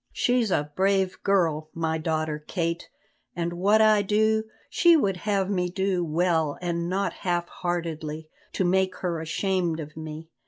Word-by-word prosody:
She's 245 -3 +1
a 150 -4 0
brave 190 -1 +1
girl, 165 -6 +1
my 160 -1 -1
daughter 155 -1 -1
Kate, 170 -2 -2 0.5
and 170 0 -2
what 200 +5 +3
I 215 -1 +5
do, 220 +2 +2 0.2
she 340 -1 +5
would 200 -10 +1
have 195 0 0
me 180 -3 0
do 190 -1 0
well 160 -2 +1
and 170 -1 -2
not 195 +2 -1
half 175 -1 -2
heartedly, 160 -3 -4 0.3
to - - 0
make 185 +1 +2
her 170 -3 -3
ashamed 170 0 -1
of 150 -1 -8
me. 160 +1 -8
175 Hz, 155 wpm, -26 LUFS, 160-195 Hz, 0.5 s, I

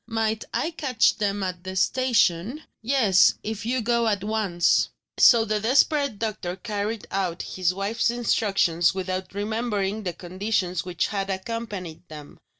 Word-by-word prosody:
"Might 220 -1 -1
I 330 - -1
catch 270 -8 +1
them 205 -1 -1
at 180 -1 -4
the 185 0 -6
station?" 235 - +1 0.2
"Yes; 225 -6 +4
if 220 0 -4
you 255 +1 0
go 235 0 +1
at 205 -3 0
once." 205 -5 +1 0.3
So 230 -2 +7
the 215 -1 0
desperate 280 +2 +2
doctor 200 -5 -3
carried 210 +1 -4
out 185 -3 -2
his 185 -2 -1
wife's 200 +6 -1
instructions 195 -7 +1
without 185 0 -4
remembering 210 -1 -2
the 180 -4 -3
conditions 185 0 -2
which 175 -2 -1
had 200 -1 -3
accompanied 190 -4 -5
them. 150 -2 -11
205 Hz, 145 wpm, -25 LUFS, 185-230 Hz, 0.3 s, So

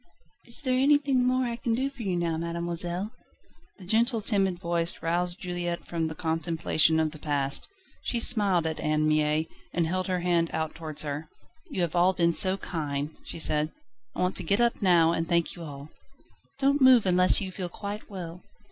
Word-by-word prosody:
"Is 235 +4 +2
there 255 -2 0
anything 275 -2 +3
more 255 0 +1
I 235 -1 -3
can 235 -1 -1
do 265 +3 -1
for 275 -3 -11
you 190 -5 -1
now, 170 -2 -1
mademoiselle?" 170 +3 -4 0.7
The 190 - -13
gentle, 230 +4 +2
timid 195 -4 0
voice 170 -1 -1
roused 175 +2 0
Juliette 175 -1 -4
from 165 -2 -2
the 160 - -6
contemplation 160 -1 +1
of 160 -1 0
the 155 - -11
past. 140 -2 +1 0.3
She 235 - -1
smiled 200 -8 +4
at 160 -1 -3
Anne 155 0 0
Mie, 155 0 +1 0.3
and 170 -1 0
held 185 +3 -2
her 185 -1 -1
hand 170 -1 +1
out 160 -1 -2
towards 155 -2 -4
her. 150 +1 -5 0.4
"You 195 - -3
have 170 0 -3
all 180 +2 +4
been 170 -1 +2
so 190 +3 +4
kind," 150 -4 -4
she - - -8
said, 155 -1 +1 0.4
"I - - -3
want 180 +1 0
to - - -3
get 200 +6 +1
up 235 -1 +1
now 170 -4 +4
and 165 0 -2
thank 170 -1 +1
you 175 - -11
all." 145 -1 -9 0.7
"Don't 280 +1 +1
move 255 -4 +6
unless 180 0 +4
you 190 -2 -4
feel 185 -1 -5
quite 205 +3 -7
well." 180 -3 -8
175 Hz, 190 wpm, -27 LUFS, 160-200 Hz, 0.7 s, move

